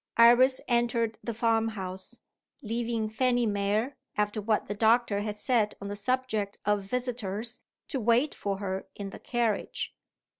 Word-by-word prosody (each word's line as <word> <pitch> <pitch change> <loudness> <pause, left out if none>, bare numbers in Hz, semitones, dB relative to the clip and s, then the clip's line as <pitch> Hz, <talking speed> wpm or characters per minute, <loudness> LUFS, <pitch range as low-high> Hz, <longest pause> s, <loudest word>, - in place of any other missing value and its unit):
Iris 245 +3 +7
entered 235 -2 +1
the 235 - -2
farm 225 -1 +2
house; 190 +5 -6 0.5
leaving 230 0 -1
Fanny 245 +2 +2
Mere, 210 +5 0 0.2
after 210 +1 0
what 215 +1 +1
the - - -3
doctor 220 0 +3
had 210 0 -3
said 220 -3 +1
on 200 - -6
the 205 - -3
subject 220 -2 -1
of 210 0 +2
visitors, 230 0 -2 0.3
to 270 - -1
wait 240 +6 +3
for 200 -1 -3
her 190 -1 -4
in 200 -1 -6
the - - -9
carriage. 235 -4 -1
225 Hz, 150 wpm, -29 LUFS, 205-240 Hz, 0.5 s, Iris